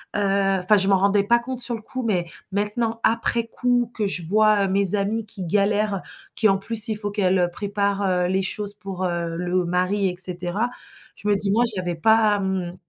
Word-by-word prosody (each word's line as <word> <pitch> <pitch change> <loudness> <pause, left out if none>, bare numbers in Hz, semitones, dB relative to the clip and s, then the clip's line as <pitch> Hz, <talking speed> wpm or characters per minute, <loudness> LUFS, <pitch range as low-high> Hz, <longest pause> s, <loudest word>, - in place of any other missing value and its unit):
Heu, 195 -1 +1
enfin, 205 +3 +4
je 195 0 +1
m'en 195 -1 +4
rendais 200 +1 +2
pas 235 +3 +3
compte 255 +1 -3
sur 240 -1 +4
le 220 - -9
coup, 255 +3 -6
mais 185 -6 0 0.3
maintenant, 220 +3 -2
après 230 0 0
coup, 245 0 0
que 215 - -2
je 180 -3 -3
vois, 210 +1 +3
heu, - - -1
mes 195 +1 +2
amies 210 +3 -2
qui 195 -2 -9
galèrent, 205 +2 0 0.3
qui, 220 - +3
en 195 - +2
plus, 220 +2 +3
il 215 - -2
faut 205 -1 -1
qu'elles 185 -3 +1
préparent, 200 +1 -2
heu, 180 -1 +1
les 190 +1 0
choses 205 +1 -2
pour, 195 -2 -7
heu, 170 -1 -3
le 180 0 -1
mari 185 +3 0
et 180 - -3
cetera. 180 +5 +2 0.5
Je 205 - -8
me 205 - +3
dis: 195 0 -1
«Moi, 235 +3 +3
j'y 190 - -4
avais 175 -1 -3
pas, 215 +3 +3
mmh, 185 -2 -3
200 Hz, 215 wpm, -22 LUFS, 185-215 Hz, 0.5 s, enfin